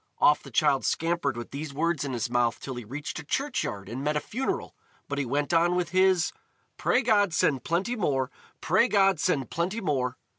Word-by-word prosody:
Off - - +4
the - - -11
child - - +2
scampered 165 -6 0
with 120 - -7
these 140 0 -6
words 165 -1 0
in 140 - -3
his 120 -3 -1
mouth 120 -1 +1
till 135 - -6
he 120 -1 -6
reached 140 +10 -6
a - - -8
churchyard 140 - -2
and 120 +6 -5
met 150 +1 0
a - - +2
funeral, 250 - -3 0.3
but 145 0 -3
he 140 - 0
went 145 +6 -1
on 170 +1 +3
with 180 -2 0
his: 185 -1 +3 0.4
"Pray 250 - +2
God 205 -6 +3
send 135 -4 +2
plenty 190 +9 0
more! 140 - 0 0.3
Pray 190 +8 +3
God 195 -6 +3
send 145 -8 0
plenty 180 +7 -1
more!" 130 - -1
155 Hz, 200 wpm, -27 LUFS, 135-185 Hz, 0.4 s, Off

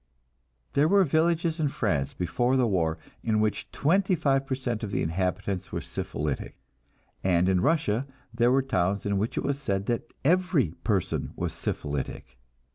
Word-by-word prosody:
There 145 +2 +4
were 200 +3 +5
villages 165 +1 +1
in 155 - +2
France 75 - -1
before 120 +9 +1
the 125 - +3
war 85 -7 +1 0.3
in 110 -2 +1
which 110 -1 -1
twenty 185 +5 +2
five 135 -4 +1
per 130 - 0
cent 120 -4 -3
of 105 - -2
the - - -1
inhabitants 90 +3 -2
were - - -2
syphilitic, 75 -2 -4 0.7
and 90 -1 +3
in 95 -1 +3
Russia 140 -5 +1 0.3
there 120 +1 +3
were 135 +1 +3
towns 100 -6 0
in 100 -1 +1
which 110 +3 -2
it - - 0
was 140 0 -1
said 100 -6 -1
that 120 0 -2
every 175 - +3
person 100 -6 0
was - - -2
syphilitic. 70 -3 -4
115 Hz, 165 wpm, -27 LUFS, 95-140 Hz, 0.7 s, were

